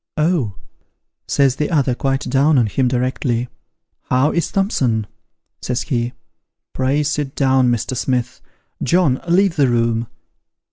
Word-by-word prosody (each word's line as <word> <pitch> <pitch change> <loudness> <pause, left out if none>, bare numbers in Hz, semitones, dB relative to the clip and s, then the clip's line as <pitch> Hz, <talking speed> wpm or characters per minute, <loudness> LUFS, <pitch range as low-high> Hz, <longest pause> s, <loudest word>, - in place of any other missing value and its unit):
'Oh,' 150 - +1 0.7
says 135 -2 +2
the 150 - -1
other, 140 -6 +2
quite 135 +2 -1
down 140 +3 +2
on 120 - +4
him 125 +5 0
directly, 125 -1 -1 0.3
' - - -55
How 130 +4 +3
is 170 - -1
Thompson? 130 - 0 0.3
' - - -56
says 125 +1 -2
he; 120 -2 -2 0.3
' - - -62
Pray 135 +3 +1
sit 145 -2 -2
down, 130 -2 +3
Mr. 120 +2 -1
Smith: 125 -1 -2 0.4
John, 165 -7 +2
leave 180 0 +2
the 140 -3 +4
room.' 115 -1 0
130 Hz, 145 wpm, -19 LUFS, 120-150 Hz, 0.7 s, on